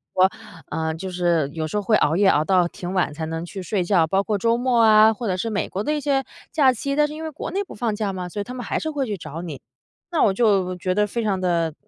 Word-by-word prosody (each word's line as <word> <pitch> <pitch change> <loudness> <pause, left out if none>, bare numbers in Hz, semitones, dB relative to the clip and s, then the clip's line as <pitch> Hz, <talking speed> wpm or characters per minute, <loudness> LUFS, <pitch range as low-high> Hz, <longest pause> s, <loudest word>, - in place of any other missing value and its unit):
说， 185 +1 +5 0.4
呃 160 0 -2
就 190 +3 -6
是 175 -5 +1
有 160 -1 -3
时 210 - -3
候 205 - -1
会 215 +2 +3
熬 155 +4 +2
夜， 200 - +4
熬 150 -5 +4
到 180 0 +3
挺 180 +1 -7
晚 180 -6 0
才 160 +1 -4
能 165 +1 -4
去 190 +1 -7
睡 190 +1 -1
觉。 175 -2 +3
包 195 +4 +2
括 210 -1 -1
周 230 +3 +2
末 245 -2 +2
啊， 220 0 +7
或 230 +1 -5
者 185 -2 0
是 230 - -2
美 210 -2 -2
国 195 - -3
的 300 - 0
一 300 - -2
些 275 -2 +1 0.3
假 270 -5 +4
期 275 +4 -3
但 300 0 +4
是 300 - -8
因 315 +1 -7
为 315 - -4
国 300 - -6
内 395 +2 -1
不 - - -12
放 220 -1 -1
假 210 -2 -2
嘛， 185 -2 -5
所 205 +4 -5
以 - - -2
他 250 - -8
们 245 -2 -6
还 - - -1
是 315 - -3
会 285 -3 -1
去 210 -4 -3
找 165 0 -7
你， 160 -6 -7 0.5
那 330 - +1
我 195 - +4
就 195 -4 +2
觉 185 +1 -1
得 210 +1 +2
非 235 +2 -3
常 195 -3 0
地 170 -3 0
200 Hz, 315 characters per minute, -23 LUFS, 175-235 Hz, 0.5 s, 啊